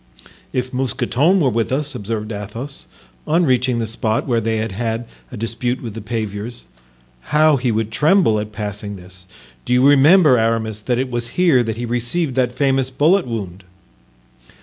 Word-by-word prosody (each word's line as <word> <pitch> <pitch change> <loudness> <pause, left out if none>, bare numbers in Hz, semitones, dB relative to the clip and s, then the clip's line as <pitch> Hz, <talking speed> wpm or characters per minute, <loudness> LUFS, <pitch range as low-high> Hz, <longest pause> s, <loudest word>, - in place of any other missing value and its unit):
"If 130 0 -3
Mousqueton 135 +7 +1
were 135 -7 +2
with 115 +1 -1
us," 145 +2 -1
observed 105 +1 -4
Athos, 115 +7 -7 0.4
on 165 +3 +3
reaching 125 -2 +1
the 115 - -1
spot 110 0 -1
where 120 -4 +1
they 110 0 -1
had 110 0 -2
had 115 +3 -3 0.3
a 125 - -7
dispute 120 +3 -2
with 115 -4 -7
the 115 - -7
paviers, 110 +1 -5 0.7
"how 150 0 +4
he 125 -1 0
would 110 0 -1
tremble 150 - +3
at 105 0 -5
passing 105 -1 -5
this! 90 0 -14 0.4
Do - - -1
you 125 +2 +5
remember, 145 -1 +6
Aramis, 110 -1 -1
that 120 +2 -1
it 130 0 -2
was 120 -1 -2
here 170 -8 +4
he 115 +1 -3
received 125 +6 -1
that 125 -1 0
famous 135 -2 +1
bullet 160 +7 +2
wound?" 100 -6 -5
120 Hz, 170 wpm, -19 LUFS, 110-135 Hz, 0.7 s, remember